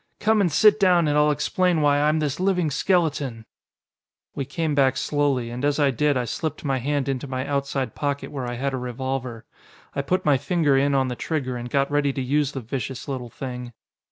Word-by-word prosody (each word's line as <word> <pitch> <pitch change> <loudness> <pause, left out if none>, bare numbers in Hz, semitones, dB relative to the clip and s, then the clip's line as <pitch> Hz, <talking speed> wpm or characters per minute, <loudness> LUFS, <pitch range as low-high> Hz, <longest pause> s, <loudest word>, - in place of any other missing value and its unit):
Come 220 0 +3
and 180 -4 +2
sit 210 +7 +5
down 180 -4 +4
and 145 - +1
I'll 150 0 +4
explain 165 +3 +1
why 145 -1 +3
I'm 150 +1 +3
this 150 -1 -1
living 180 -4 +1
skeleton." 145 -9 0 0.9
We 140 - -3
came 150 +3 -2
back 135 -2 +3
slowly, 140 -5 0
and 125 +3 -5
as 145 0 +2
I 140 -2 +4
did 145 +3 +1
I 125 - -1
slipped 155 +7 -4
my 135 -2 0
hand 140 +2 -1
into 135 0 -2
my 130 0 -3
outside 140 -4 -2
pocket 145 -1 -3
where 135 -4 -4
I 120 - -4
had 135 +2 -2
a - - -1
revolver. 125 -2 -4 0.5
I 140 - 0
put 185 +6 -1
my 145 -3 +4
finger 150 -1 +2
in 140 +1 +2
on 130 -1 +2
the 125 - -3
trigger 130 -3 -3
and 120 0 -5
got 140 +2 +1
ready 145 -1 +2
to 135 - -3
use 145 +2 0
the 135 - -4
vicious 125 +3 -5
little 130 -3 -4
thing. 125 -1 -7
140 Hz, 215 wpm, -24 LUFS, 130-150 Hz, 0.9 s, sit